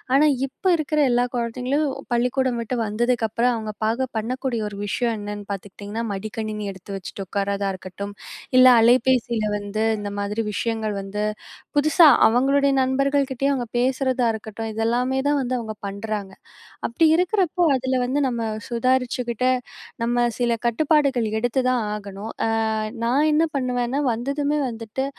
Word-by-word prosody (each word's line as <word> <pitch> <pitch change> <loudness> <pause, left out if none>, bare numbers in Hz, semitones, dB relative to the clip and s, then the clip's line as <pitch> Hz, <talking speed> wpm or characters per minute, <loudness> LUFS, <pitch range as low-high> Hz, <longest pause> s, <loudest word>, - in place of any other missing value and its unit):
ஆனா 300 +2 +5 0.2
இப்ப 265 - -26
இருக்குற 305 0 -1
எல்லா 245 +1 +3
குழந்தைங்களும் 250 +5 -1 0.3
பள்ளிக்கூடம் 250 0 +1
விட்டு 245 +2 -3
வந்ததுக்கப்புறம் 235 +2 +1
அவுங்க 215 -1 -5
பார்க்க 245 +3 -1
பண்ணக்கூடிய 250 0 -2
ஒரு 200 - -9
விஷயம் 235 +2 0
என்னன்னு 205 0 -6
பார்த்துக்கிட்டீங்கன்னா, 205 +3 -6
மடிக்கணினி 215 +1 -4
எடுத்து 190 +1 -8
வச்சுட்டு 195 +1 -7
உட்காரதா 200 0 -1
இருக்கட்டும், 185 0 -12 0.6
இல்ல 255 0 +9
அலைபேசில 235 -1 +3
வந்து, 205 +1 -4 0.2
இந்த 205 0 -4
மாதிரி 210 +2 -2
விஷயங்கள் 220 -2 -1
வந்து, 200 +2 -5 0.6
புதுசா 310 +3 +6 0.2
அவுங்களுடைய 275 +4 +3
நண்பர்கள் 275 +1 +1
கிட்டேயும் 275 +2 0
அவுங்க 245 -2 -2
பேசுறதா 260 -1 +1
இருக்கட்டும், 220 +1 -6
இதெல்லாமே 245 +4 0
தான் 290 -1 +2
வந்து 255 0 -2
அவுங்க 220 -2 -5
பண்ணுறாங்க. 200 -1 -4 0.5
அப்படி 280 +8 +2
இருக்கிறப்போ, 360 -1 +1
அதுல 260 0 0
வந்து 270 +4 0
நம்ம 235 -2 -2 0.3
சுதாரிச்சுக்கிட்டு, 250 0 0 0.5
நம்ம 240 +1 +2
சில 240 -1 +1
கட்டுப்பாடுகள் 275 -1 +2
எடுத்து 245 +2 +1
தான் 245 -3 +1
ஆகணும். 205 +1 -7
அ - - +1 0.6
நான் 275 +6 +3
என்ன 310 +2 +3
பண்ணுவேன்னா 250 0 -1
வந்ததுமே 280 +5 -1
வந்துட்டு 225 +3 -4
240 Hz, 135 wpm, -23 LUFS, 215-260 Hz, 0.6 s, இல்ல